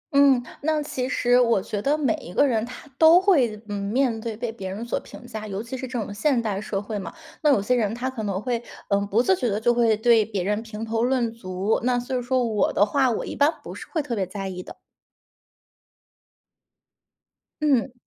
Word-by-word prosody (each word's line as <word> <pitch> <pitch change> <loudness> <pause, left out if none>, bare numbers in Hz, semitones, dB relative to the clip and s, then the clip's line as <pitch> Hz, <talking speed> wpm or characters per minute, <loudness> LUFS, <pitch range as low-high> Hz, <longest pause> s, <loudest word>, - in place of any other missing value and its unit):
嗯， 275 -3 +5 0.2
那 310 +1 +1
其 260 -3 -3
实 245 -2 +3
我 230 -4 +3
觉 205 +2 -4
得 290 +5 +1
每 270 -7 +1
一 175 - -10
个 285 - +5
人 230 -5 +1
他 250 - -10
都 325 +2 +8
会 265 - +2
嗯， 205 -1 -4
面 235 +1 0
对 225 -1 -5
被 235 0 -3
别 195 -4 -7
人 205 +5 -5
所 235 - -1
评 245 - -13
价， 220 -2 -7
尤 200 +1 -4
其 235 +3 -6
是 260 0 -5
这 245 -1 -3
种 205 -1 -4
现 250 +5 +1
代 210 -4 -2
社 205 -2 -3
会 205 +1 -5
嘛， 190 - -6 0.3
那 300 - +4
有 270 - +5
些 215 +6 0
人 225 -3 +1
他 255 +2 -3
可 250 -4 -6
能 200 -3 -2
会， 235 +1 -2 0.3
呃， 200 -1 +2
不 220 +4 +2
自 190 -6 +4
觉 245 +2 -1
地 205 - -1
就 240 +2 +3
会 230 -2 +3
对 225 0 +4
别 205 -3 -3
人 210 +3 0
评 225 -1 -7
头 225 0 -1
论 245 -2 +1
足， 190 -1 -1
那 250 0 +2
所 250 +2 -4
以 250 - 0
说 250 +1 +1
我 220 -3 +1
的 205 - +3
话， 260 +5 +2
我 230 - -2
一 - - -6
般 290 +2 +4
不 - - -8
是 - - -9
会 315 -4 -1
特 245 -4 -3
别 195 -3 -1
在 195 +1 -5
意 180 -1 -6
的。 - - -11 2.9
嗯。 270 -4 +2
230 Hz, 245 characters per minute, -24 LUFS, 210-255 Hz, 2.9 s, 都